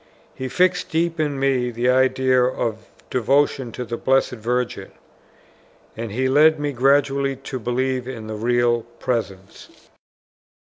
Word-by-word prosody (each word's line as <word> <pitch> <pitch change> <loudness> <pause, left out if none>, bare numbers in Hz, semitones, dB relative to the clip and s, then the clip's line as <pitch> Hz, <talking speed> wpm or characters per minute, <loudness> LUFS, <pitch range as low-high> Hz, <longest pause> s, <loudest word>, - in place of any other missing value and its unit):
He 130 - -5
fixed 180 +6 +1
deep 165 0 -1
in 145 -3 -1
me 130 -2 +1
the 120 +1 -2
idea 130 0 +3
of 115 -3 -2 0.2
devotion 130 0 +1
to 125 - -5
the 120 0 -4
Blessed 135 +2 +2
Virgin, 125 +1 -3 1.1
and 115 -1 -5
he 130 +5 0
led 150 +3 +4
me 145 0 -1
gradually 140 +1 +2
to 135 0 -7
believe 125 +2 -1
in 120 -4 -7
the 110 - -6
Real 120 +2 +1 0.2
Presence. 95 -6 -4
130 Hz, 135 wpm, -22 LUFS, 120-135 Hz, 1.1 s, led